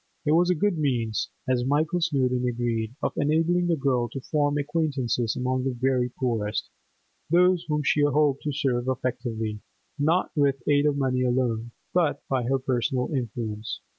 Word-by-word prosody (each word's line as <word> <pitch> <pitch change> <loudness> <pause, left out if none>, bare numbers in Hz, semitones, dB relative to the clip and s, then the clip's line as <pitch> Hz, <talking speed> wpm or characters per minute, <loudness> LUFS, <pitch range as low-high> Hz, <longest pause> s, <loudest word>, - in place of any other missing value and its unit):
It 150 - +2
was 175 +3 +4
a 180 - +3
good 185 0 0
means, 120 -7 0 0.2
as 125 -1 +1
Michael 150 +6 +1
Snowdon 130 -6 +1
agreed, 120 -1 -2
of - - 0
enabling 165 +4 +2
the 170 - +2
girl 130 -5 0
to 135 - -5
form 145 +1 0
acquaintances 140 -6 -1
among 130 0 -1
the 130 -1 -1
very 130 -1 +1
poorest, 115 -5 -2 0.6
those 180 +1 +4
whom 150 -1 0
she 145 - +2
hoped 145 -1 +2
to 150 - -2
serve 130 -3 -1
effectively—not 125 - -2
with 140 -4 +1
aid 145 0 +4
of 145 -1 +1
money 130 -2 +1
alone, 120 -2 0 0.2
but 175 -4 +1
by 130 -2 0
her 135 +2 +2
personal 130 +1 -1
influence. 115 -3 -3
135 Hz, 160 wpm, -26 LUFS, 120-150 Hz, 0.6 s, was